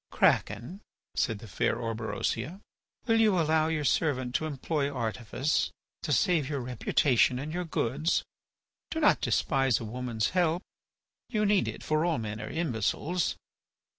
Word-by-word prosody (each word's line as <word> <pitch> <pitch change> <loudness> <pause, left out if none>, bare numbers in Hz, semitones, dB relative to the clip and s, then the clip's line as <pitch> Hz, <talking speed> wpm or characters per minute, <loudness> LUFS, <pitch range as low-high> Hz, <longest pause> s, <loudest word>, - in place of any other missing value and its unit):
"Kraken," 180 - +1 0.3
said 115 - +1
the 110 - -11
fair 95 - 0
Orberosia, 115 - -3 0.5
"will 225 -1 +4
you 210 -5 +4
allow 160 -1 +3
your 160 -2 -1
servant 130 -2 +1
to 155 - 0
employ 145 0 -1
artifice 120 +3 -1 0.3
to 155 - -3
save 155 0 +2
your 145 -2 -1
reputation 125 +1 +2
and 150 +4 -5
your 180 0 -2
goods? 155 +1 0 0.7
Do 320 - -2
not 300 - +4
despise 135 -5 +2
a 115 - -6
woman's 115 -1 -2
help. 175 -1 +1 0.7
You 215 -3 +1
need 205 -2 +3
it, - - -5
for 155 0 +1
all 170 -4 +1
men 110 -1 -4
are 110 - -5
imbeciles." 160 - -1
145 Hz, 145 wpm, -29 LUFS, 120-165 Hz, 0.7 s, will